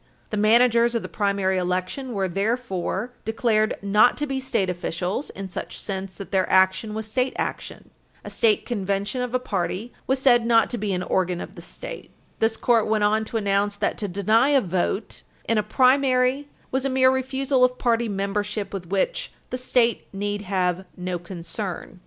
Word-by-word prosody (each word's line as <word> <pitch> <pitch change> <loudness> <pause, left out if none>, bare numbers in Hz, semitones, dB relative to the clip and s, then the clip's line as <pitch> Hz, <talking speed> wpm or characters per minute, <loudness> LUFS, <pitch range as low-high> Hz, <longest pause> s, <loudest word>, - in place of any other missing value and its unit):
The - - -1
managers 235 +2 +4
of 230 - -1
the - - -4
primary 200 -2 0
election 185 +9 -2
were 195 -2 0
therefore 200 +2 -2
declared 220 -1 +1
not 210 +4 +4
to 295 - -1
be 270 -2 -2
state 260 -7 0
officials 180 - -3
in 195 -1 -7
such 180 - -6
sense 190 -2 -5
that 195 - -9
their 190 -2 +1
action 190 +3 +3
was 220 0 -3
state 255 +4 0
action. - - -5 0.3
A - - -6
state 220 -3 +2
convention 200 +2 -2
of 250 0 -2
a - - +3
party 205 0 -3
was 265 - +2
said 250 -3 +4
not 230 -1 +3
to 240 - -3
be 205 -1 -1
an 180 -1 -1
organ 180 -2 0
of - - -7
the - - -11
state. - - -9 0.3
This 225 0 +1
Court 230 -3 +3
went 215 -1 +1
on 215 +1 +2
to 225 - -3
announce 200 -1 +1
that - - -1
to 205 - -2
deny 215 +7 +3
a 285 -2 +5
vote 190 +2 -2 0.3
in 230 -1 +2
a - - +3
primary 255 +4 +3 0.2
was 265 0 0
a 275 - 0
mere 260 0 +4
refusal 265 0 +1
of 250 0 +3
party 235 -2 +1
membership, 200 +1 -2
with 185 -3 -5
which 200 - -1 0.2
"the - - -1
state 245 -2 +1
need 205 +1 -3
have 185 -2 0
no 180 -1 -3
concern," 175 +2 -6
loc. - - -18
215 Hz, 190 wpm, -24 LUFS, 195-250 Hz, 0.3 s, a